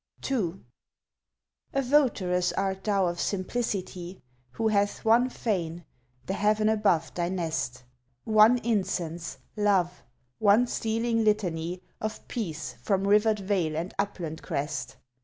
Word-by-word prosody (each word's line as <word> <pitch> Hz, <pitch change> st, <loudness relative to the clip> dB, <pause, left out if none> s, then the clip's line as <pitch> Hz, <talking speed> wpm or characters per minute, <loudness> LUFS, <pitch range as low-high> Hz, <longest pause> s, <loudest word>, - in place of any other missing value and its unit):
2 195 Hz, -9 st, -1 dB, 1.2 s
A 275 Hz, -, +3 dB
votaress 205 Hz, -10 st, +2 dB
art 190 Hz, -1 st, -1 dB
thou 200 Hz, -3 st, +2 dB
of 175 Hz, 0 st, -2 dB
Simplicity, 190 Hz, -3 st, -3 dB, 0.3 s
Who 225 Hz, -1 st, +1 dB
hath 205 Hz, 0 st, 0 dB
one 235 Hz, +3 st, +5 dB
fane 175 Hz, -9 st, -2 dB, 0.4 s
the 190 Hz, -, -2 dB
heaven 215 Hz, +1 st, +2 dB
above 190 Hz, -8 st, +2 dB
thy 175 Hz, -1 st, -1 dB
nest; 160 Hz, -8 st, -2 dB, 0.4 s
One 215 Hz, +2 st, +6 dB
incense 180 Hz, -6 st, -1 dB, 0.2 s
love; 195 Hz, -4 st, +1 dB, 0.4 s
one 215 Hz, +3 st, +5 dB
stealing 230 Hz, 0 st, 0 dB
litany 180 Hz, -5 st, 0 dB, 0.2 s
Of 215 Hz, 0 st, -4 dB
peace 165 Hz, -10 st, -4 dB
from 195 Hz, -1 st, +1 dB
rivered 210 Hz, +1 st, +4 dB
vale 185 Hz, -6 st, 0 dB
and 170 Hz, +4 st, -3 dB
upland 175 Hz, -6 st, -3 dB
crest. 145 Hz, 0 st, -3 dB
195 Hz, 120 wpm, -28 LUFS, 175-215 Hz, 1.2 s, One